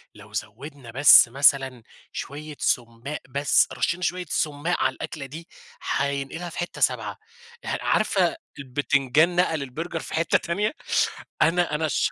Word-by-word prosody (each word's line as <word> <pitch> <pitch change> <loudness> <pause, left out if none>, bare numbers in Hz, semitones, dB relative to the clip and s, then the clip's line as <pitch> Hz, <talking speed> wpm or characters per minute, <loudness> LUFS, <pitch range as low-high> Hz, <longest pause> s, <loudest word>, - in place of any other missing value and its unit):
لو 105 +1 -15
زوَّدنا 120 +5 -7
بس 140 +1 +8
مثلًا 135 -2 +2 0.3
شوية 150 +2 -7
سُمَّاق 120 +4 -2
بس، 140 +1 +3
رشّينا 175 +2 -1
شوية 180 +1 -1
سُمَّاق 150 +3 -1
على - - +2
الأكلة 155 -3 -6
دي، 160 +5 -10 0.5
هينقِلها 140 +5 -2
في - - -11
حتّة 175 - -5
سابعة، - - 0 0.5
ه - - -1
عارفة - - +2 0.2
البتنجان 140 +4 +1
نقَل 165 -4 +1
البرجر 165 +6 -5
في - - -8
حتّة 165 +1 +2
تانية؟ 205 - -1 0.7
أنا 170 -2 +2
أنا 160 +1 0
الشخ 155 - 0
145 Hz, 140 wpm, -24 LUFS, 135-165 Hz, 0.7 s, بس